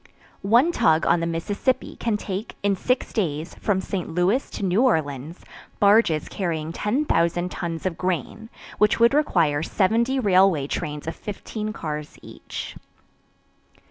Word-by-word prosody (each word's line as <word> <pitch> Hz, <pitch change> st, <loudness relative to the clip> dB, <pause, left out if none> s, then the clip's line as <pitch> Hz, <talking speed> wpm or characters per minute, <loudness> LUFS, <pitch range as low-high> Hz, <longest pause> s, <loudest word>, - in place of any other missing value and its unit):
One 250 Hz, +10 st, +5 dB
tug 170 Hz, -, +3 dB
on 170 Hz, -, +3 dB
the 170 Hz, -, -1 dB
Mississippi 200 Hz, +10 st, -1 dB
can 225 Hz, -3 st, -1 dB
take, 200 Hz, +1 st, -5 dB
in 200 Hz, -1 st, +2 dB
six 250 Hz, +7 st, -1 dB
days, 165 Hz, -6 st, -2 dB
from 205 Hz, -4 st, +1 dB
St. 190 Hz, -2 st, -4 dB
Louis 180 Hz, +10 st, +1 dB
to 200 Hz, -, -4 dB
New 190 Hz, +5 st, +2 dB
Orleans, 155 Hz, -, -1 dB, 0.3 s
barges 200 Hz, -7 st, +4 dB
carrying 165 Hz, -4 st, -3 dB
10,000 180 Hz, -, 0 dB
tons 165 Hz, -1 st, -5 dB
of 180 Hz, -3 st, -2 dB
grain, 185 Hz, -, -3 dB, 0.3 s
which 210 Hz, +1 st, +3 dB
would 235 Hz, +3 st, +5 dB
require 170 Hz, -, +2 dB
70 230 Hz, +10 st, +1 dB
railway 190 Hz, -, +4 dB
trains 150 Hz, 0 st, -4 dB
of 160 Hz, -, -4 dB
fifteen 215 Hz, +1 st, -5 dB
cars 150 Hz, -7 st, -6 dB
each. -, -, -8 dB
185 Hz, 140 wpm, -24 LUFS, 165-220 Hz, 0.3 s, One